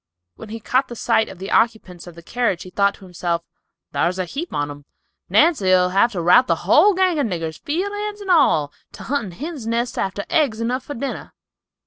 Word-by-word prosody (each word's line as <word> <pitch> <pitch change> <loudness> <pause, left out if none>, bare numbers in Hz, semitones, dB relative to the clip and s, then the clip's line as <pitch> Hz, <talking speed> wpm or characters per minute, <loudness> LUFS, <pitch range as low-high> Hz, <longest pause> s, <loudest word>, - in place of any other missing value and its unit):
When 145 - -11
he 225 +1 -6
caught 250 +1 -1
sight 220 - +1
of 190 - -10
the 190 +2 -7
occupants 215 -7 0
of 175 - -11
the 170 - -13
carriage 235 -4 -1
he 185 - -12
thought 200 +1 +2
to 195 - -15
himself, 175 -1 -3 0.5
"Thar's 180 +2 0
a 185 - -1
heap 300 - -6
on 145 0 -2
'em. 145 0 -12 0.4
Nancy'll 185 - +4
have 200 +6 +2
to 175 -3 -3
rout 245 +9 +6
the - - -1
whole 410 -2 +5
gang 370 -4 +2
of 275 - +1
niggers, 165 -5 -4
field 365 +7 -2
hands 415 0 -4
and 395 -2 -3
all, 160 - +3 0.2
to - - -10
huntin' 235 -9 -2
hin's 285 - -6
nests 235 +1 -1
after 195 +1 -2
eggs 275 -9 +1
enough 245 +3 -1
for 290 - -6
dinner." 270 +3 -5
220 Hz, 205 wpm, -21 LUFS, 180-285 Hz, 0.5 s, rout